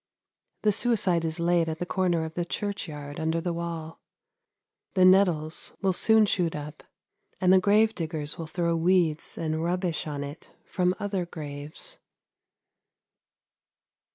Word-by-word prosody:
The 210 - +4
suicide 200 -7 +2
is 160 +1 -2
laid 170 -1 +2
in 160 - -2
the 175 - -3
corner 175 -3 0
of 160 - -7
the 175 - -1
churchyard 160 -7 -5
under 160 +1 0
the 175 +1 -2
wall. 165 -1 -5 0.9
The 185 -1 +5
nettles 175 -5 +3
will 190 -2 +1
soon 220 +3 +5
shoot 175 -5 0
up, 150 0 -7 0.6
and 185 0 +4
the 190 - +7
grave 215 +3 +4
diggers 155 -5 -3
will 165 - -6
throw 170 +1 0
weeds 165 -2 +1
and 160 0 -2
rubbish 175 -2 -1
on 145 -1 -3
it 145 +3 -9 0.2
from 180 -1 0
other 195 -3 -2
graves." 145 -2 -8
170 Hz, 140 wpm, -27 LUFS, 160-185 Hz, 0.9 s, the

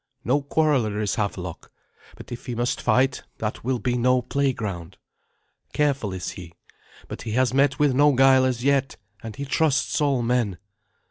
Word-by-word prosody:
No 140 +5 +2
quarreller 140 -8 +1
is 105 -2 -1
Havelok; 90 -5 -4 0.5
but - - -12
if 120 - -8
he 120 - -3
must 120 +1 -1
fight, 130 +1 +2 0.2
that 110 -1 -4
will 130 +1 0
be 125 0 -1
no 125 +1 +2
playground. 115 -11 -2 0.8
Careful 140 -8 0
is 95 -1 -5
he; 85 -2 -10 0.5
but - - -7
he 110 - -5
has 130 +1 +2
met 140 0 +2
with 145 -3 +3
no 145 +2 +4
guile 130 0 +5
as 125 -2 -1
yet, 140 -1 +1 0.3
and 110 -2 -8
he 140 - -5
trusts 135 +2 +1
all 140 -4 +1
men. 115 -6 0
125 Hz, 165 wpm, -24 LUFS, 110-140 Hz, 0.8 s, guile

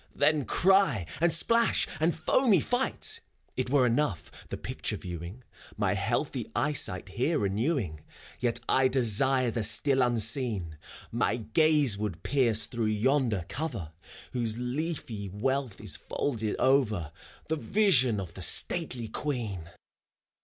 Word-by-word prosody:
Then 145 -1 +2
cry, 190 - +3
and 170 +1 +3
splash, 230 +8 +2
and 160 0 +1
foamy 200 +6 +3
fight. 265 - 0 0.4
It 130 -1 -2
were 135 -2 +3
enough, 125 - -1 0.2
the - - -4
picture - - -3
viewing, 90 +7 -8 0.2
— - - -20
My 105 -2 +1
healthy 120 +5 -2
eyesight 140 -11 +1
here 130 - 0
renewing, 100 - -1 0.2
— - - -20
Yet 120 -1 0
I 130 0 +3
desire 130 0 +2
the 115 - -2
still 135 +5 +3
unseen. 115 - +1 0.3
My 115 +1 0
gaze 135 0 +2
would 100 -6 -4
pierce 115 -6 +2
through 115 -2 -3
yonder 110 - +1
cover, 120 - -5 0.4
Whose 115 -3 -2
leafy 125 - -4
wealth 125 +2 -2
is 95 -8 -2
folded 110 - -3
over 110 - +1 0.4
The 160 - -1
vision 130 - +2
of 95 -4 -7
the - - -9
stately 120 -3 +2
Queen. 110 - -4
125 Hz, 130 wpm, -28 LUFS, 105-145 Hz, 0.4 s, cry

